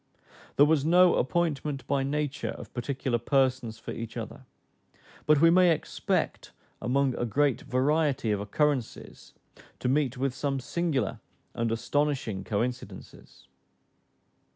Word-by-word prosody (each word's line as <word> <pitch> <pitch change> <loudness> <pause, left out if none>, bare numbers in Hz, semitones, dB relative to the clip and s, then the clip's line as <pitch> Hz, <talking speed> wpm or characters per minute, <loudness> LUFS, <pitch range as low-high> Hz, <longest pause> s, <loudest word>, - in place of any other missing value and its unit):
There 145 - +6
was 150 -2 +2
no 175 +3 +5
appointment 150 -1 -1
by 140 -1 0
nature 140 0 -2
of - - -11
particular 125 -1 -2
persons 130 -3 +1
for - - -8
each 115 +1 -6
other; 120 +3 -7 0.8
but 150 -1 +5
we 165 +2 +6
may 180 0 +5
expect 160 - -1 0.3
among 135 +2 +1
a - - 0
great 135 +4 +1
variety 135 -2 +1
of 105 - 0
occurrences 130 +4 -2 0.4
to - - -3
meet 135 -1 +1
with 135 0 -1
some 135 +1 -2
singular 140 - -1 0.3
and 115 -1 -1
astonishing 120 -3 -1
coincidences. 115 - -5
135 Hz, 125 wpm, -28 LUFS, 120-150 Hz, 0.8 s, There